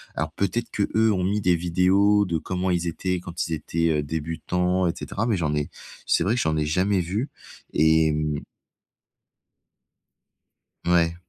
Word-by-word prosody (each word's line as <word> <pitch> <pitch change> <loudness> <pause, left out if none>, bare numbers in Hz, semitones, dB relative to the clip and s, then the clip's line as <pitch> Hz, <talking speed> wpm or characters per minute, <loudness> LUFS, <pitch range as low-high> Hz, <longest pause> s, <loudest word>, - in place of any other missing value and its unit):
Alors 80 +1 -2
peut-être, 100 +7 -2
qu'eux, 110 +2 +2
ont 95 -3 0
mis 100 +3 +1
des 90 -2 +3
vidéos 95 +4 +3
de 85 -3 -1
comment 90 +2 -2
ils 85 -1 0
étaient 90 +2 -2
quand 85 +1 -4
ils 85 - -3
étaient, 85 +2 -1
heu, - - -1
débutants 85 +4 -1
et 85 - 0
cetera, 115 +4 -3
mais 110 -4 +1
j'en 80 -4 0
n'ai 75 -1 -1 0.4
c'est - - +3
vrai 100 - +1
que 120 - 0
j'en 80 0 +1
ai 75 - +1
jamais 95 +6 +1
vu 100 - -2 0.4
et 80 0 +4
mmh 75 -1 -1 2.4
Ouais. 85 -1 +2
90 Hz, 165 wpm, -24 LUFS, 80-95 Hz, 2.4 s, et